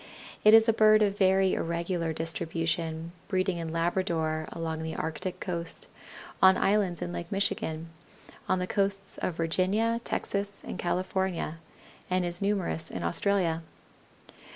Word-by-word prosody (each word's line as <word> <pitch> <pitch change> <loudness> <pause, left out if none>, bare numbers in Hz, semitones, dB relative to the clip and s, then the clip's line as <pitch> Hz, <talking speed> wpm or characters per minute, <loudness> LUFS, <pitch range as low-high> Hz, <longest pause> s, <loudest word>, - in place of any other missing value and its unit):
It 215 +1 +9
is 225 +1 +7
a 225 - +5
bird 215 0 +6
of 200 -1 +1
very 190 -1 +3
irregular 170 0 -1
distribution, 165 +1 -2 0.2
breeding 185 -1 0
in 165 -1 -4
Labrador, 165 -2 0
along 160 -1 -4
the 160 0 -4
Arctic 180 +3 -4
coast, 170 -3 -3 0.6
on 190 0 +7
islands 195 -4 +1
in 175 - -5
Lake 170 -1 -6
Michigan, 170 -5 -2 0.6
on 185 - +3
the 180 - -1
coasts 195 0 -1
of 175 - -2
Virginia, 195 +8 +1
Texas, 200 0 0
and - - -6
California, 185 -2 -1 0.5
and 185 0 +1
is 175 +1 -4
numerous 195 -5 0
in 90 - -5
Australia. 170 - +1
180 Hz, 135 wpm, -28 LUFS, 165-195 Hz, 0.6 s, It